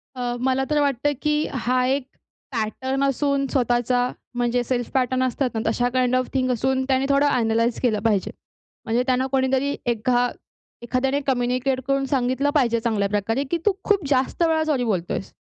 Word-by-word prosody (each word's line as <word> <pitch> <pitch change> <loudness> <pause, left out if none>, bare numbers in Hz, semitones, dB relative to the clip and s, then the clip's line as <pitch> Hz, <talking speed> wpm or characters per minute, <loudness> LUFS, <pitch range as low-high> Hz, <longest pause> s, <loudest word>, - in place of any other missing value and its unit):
अ, 245 -1 -2
मला 260 +1 +1
तर 300 -1 +2
वाटतं, 285 +1 +1
की 300 0 +1
हा 250 0 +1
एक 270 0 0 0.5
पॅटर्न 260 +4 -2
असून 275 0 +1
स्वतःचा, 245 -1 +1 0.3
म्हणजे 245 0 +1
सेल्फ 245 -1 -2
पॅटर्न 260 0 +1
असतात 255 +1 0
ना 220 - 0
तशा 245 +2 +1
काइंड 255 0 +2
ऑफ 255 0 +1
थिंग 255 -1 +1
असून 260 +2 0
त्याने 265 0 +2
थोडं 280 +1 +4
ॲनलाइज 230 -2 +1
केलं 220 -5 +1
पाहिजे. 205 -4 +1 0.5
म्हणजे 235 +2 +1
त्यांना 255 0 +2
कोणीतरी 265 +1 +1
एका 245 +1 +1 0.5
एखाद्याने 265 +3 0
कम्युनिकेट 255 +1 0
करून 275 0 +1
सांगितलं 260 +1 0
पाहिजे 235 -5 +3
चांगल्या 215 -4 0
प्रकारे, 225 +6 0
की 340 - +2
तू 415 - +5
खूप 400 -6 +1
जास्त 270 +5 +1
वेळा 320 -1 +2
सॉरी 280 -5 0
बोलतोयेस. 195 -4 -2
255 Hz, 165 wpm, -23 LUFS, 240-275 Hz, 0.5 s, तू